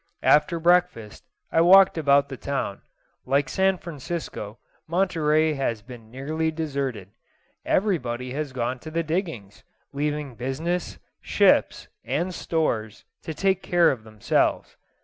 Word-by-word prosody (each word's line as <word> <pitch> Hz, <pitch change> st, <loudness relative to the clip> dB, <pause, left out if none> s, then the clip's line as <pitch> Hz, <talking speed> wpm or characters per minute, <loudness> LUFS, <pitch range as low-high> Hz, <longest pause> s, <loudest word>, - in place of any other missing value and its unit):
After 150 Hz, +3 st, +4 dB
breakfast 165 Hz, -11 st, +1 dB, 0.3 s
I 165 Hz, -, +3 dB
walked 190 Hz, +3 st, +7 dB
about 140 Hz, -3 st, +3 dB
the 135 Hz, -, -6 dB
town. 135 Hz, -7 st, -4 dB, 0.4 s
Like 140 Hz, +1 st, +1 dB
San 190 Hz, +4 st, +1 dB
Francisco, 150 Hz, -9 st, -6 dB, 0.3 s
Monterey 160 Hz, -3 st, +2 dB
has 120 Hz, -6 st, -2 dB
been 115 Hz, -2 st, -12 dB
nearly 155 Hz, +6 st, -2 dB
deserted. 140 Hz, -, -4 dB, 0.6 s
Everybody 130 Hz, -, 0 dB
has 145 Hz, 0 st, -3 dB
gone 125 Hz, 0 st, -3 dB
to 155 Hz, -, -9 dB
the 165 Hz, +1 st, -1 dB
diggings, 160 Hz, -, -4 dB, 0.3 s
leaving 145 Hz, -1 st, -2 dB
business, 135 Hz, -, -3 dB, 0.2 s
ships, -, -, +2 dB, 0.2 s
and 180 Hz, +3 st, -2 dB
stores, 115 Hz, -12 st, -2 dB, 0.2 s
to 160 Hz, -, -6 dB
take 190 Hz, +1 st, +1 dB
care 175 Hz, -2 st, +3 dB
of 120 Hz, -5 st, -6 dB
themselves. 110 Hz, -2 st, -1 dB
150 Hz, 125 wpm, -24 LUFS, 125-170 Hz, 0.6 s, walked